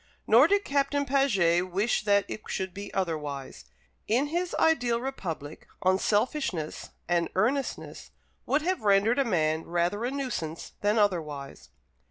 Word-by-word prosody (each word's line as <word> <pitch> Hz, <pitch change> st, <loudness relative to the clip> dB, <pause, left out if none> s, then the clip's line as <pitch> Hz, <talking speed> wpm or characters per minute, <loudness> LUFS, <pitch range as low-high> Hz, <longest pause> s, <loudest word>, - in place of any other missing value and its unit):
Nor 245 Hz, +7 st, +6 dB
did 405 Hz, +2 st, +2 dB
Captain 285 Hz, 0 st, 0 dB
Paget 190 Hz, -11 st, +2 dB
wish 205 Hz, +4 st, 0 dB
that 200 Hz, -1 st, +3 dB
it 215 Hz, -, -6 dB
should 190 Hz, -2 st, -3 dB
be 200 Hz, +1 st, -7 dB
otherwise. 150 Hz, -7 st, -4 dB, 0.4 s
In 260 Hz, +7 st, +1 dB
his 345 Hz, +2 st, -2 dB
ideal 245 Hz, -8 st, +2 dB
republic, 170 Hz, -, -6 dB, 0.2 s
unselfishness 195 Hz, -, 0 dB, 0.2 s
and 170 Hz, 0 st, +1 dB
earnestness 255 Hz, +8 st, -1 dB, 0.4 s
would 295 Hz, +2 st, +1 dB
have 370 Hz, +2 st, -1 dB
rendered 210 Hz, +4 st, +3 dB
a -, -, +4 dB
man 160 Hz, -6 st, +1 dB
rather 175 Hz, +5 st, -1 dB
a 245 Hz, -, 0 dB
nuisance 250 Hz, -, -4 dB
than 210 Hz, +2 st, +2 dB
otherwise. 155 Hz, -9 st, -1 dB
205 Hz, 135 wpm, -28 LUFS, 170-270 Hz, 0.4 s, Nor